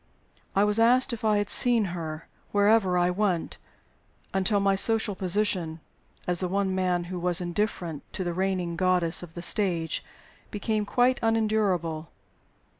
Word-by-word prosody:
I 200 - +4
was 210 +1 +1
asked 245 +2 +4
if 230 - -7
I 215 -1 +2
had 205 -1 0
seen 240 -4 +4
her, 160 -2 -6 0.2
wherever 205 -2 +3
I 175 0 +2
went, 185 -3 -2 0.7
until 195 +2 +1
my 200 0 +2
social 220 +2 +4
position, 185 -4 -1 0.5
as 180 -1 0
the 185 - +1
one 195 +1 -1
man 180 -2 0
who 180 +1 -6
was 175 0 +1
indifferent 175 -3 -3
to 185 - -3
the 175 -1 -3
reigning 185 -2 -2
goddess 180 -2 +1
of 170 -2 -11
the 175 - -6
stage, 175 -4 0 0.5
became 210 0 -2
quite 250 +3 +2
unendurable. 210 -8 0
190 Hz, 150 wpm, -26 LUFS, 175-210 Hz, 0.7 s, I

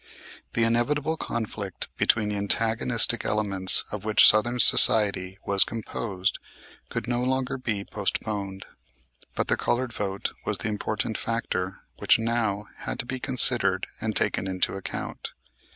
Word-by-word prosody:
The 115 - +1
inevitable 140 +7 0
conflict 110 - -5
between 110 -2 +1
the 105 - -3
antagonistic 115 +3 +2
elements 100 -3 +2
of 105 -2 -6
which 110 0 +5
Southern 120 +3 +3
society 100 -5 +5
was 100 -1 +4
composed 100 -4 -4 0.5
could - - -5
no 120 0 -1
longer 130 +1 -1
be 105 -5 -3
postponed. 100 -1 -4 0.7
But - - -2
the - - +1
colored 120 0 -2
vote 100 -2 -4
was - - -3
the 110 - -4
important 110 +1 -3
factor 105 -5 -3 0.2
which - - +4
now 110 -3 -1
had - - -5
to - - -4
be 130 +1 -5
considered 130 -1 +4 0.2
and - - -3
taken 95 - 0
into 95 -1 -1
account. 95 - -7
110 Hz, 135 wpm, -25 LUFS, 100-120 Hz, 0.7 s, which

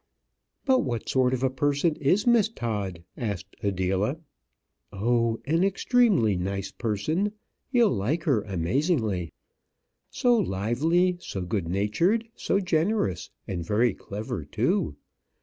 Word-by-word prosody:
"But 260 -2 +4
what 120 -4 -2
sort 130 -1 +2
of 130 0 -1
a 130 - +3
person 145 +4 +1
is 180 +9 +2
Miss 235 -4 +4
Todd?" 100 - -4
asked 100 -4 -5
Adela. 95 - 0 0.7
"Oh, 115 +2 +1
an 165 +5 +2
extremely 195 - +3
nice 95 +2 -3
person; 155 - -1 0.4
you'll 240 -5 +4
like 140 - -1
her 130 -9 +2
amazingly 100 - 0 0.8
so 245 -1 +3
lively, 165 - +1
so 100 - -5
good 90 0 -2
natured, 105 - +1
so 195 - 0
generous; 180 - 0 0.2
and 90 -3 -3
very 110 +5 +2
clever 105 +3 -5
too. - - 0
120 Hz, 120 wpm, -26 LUFS, -, 0.8 s, But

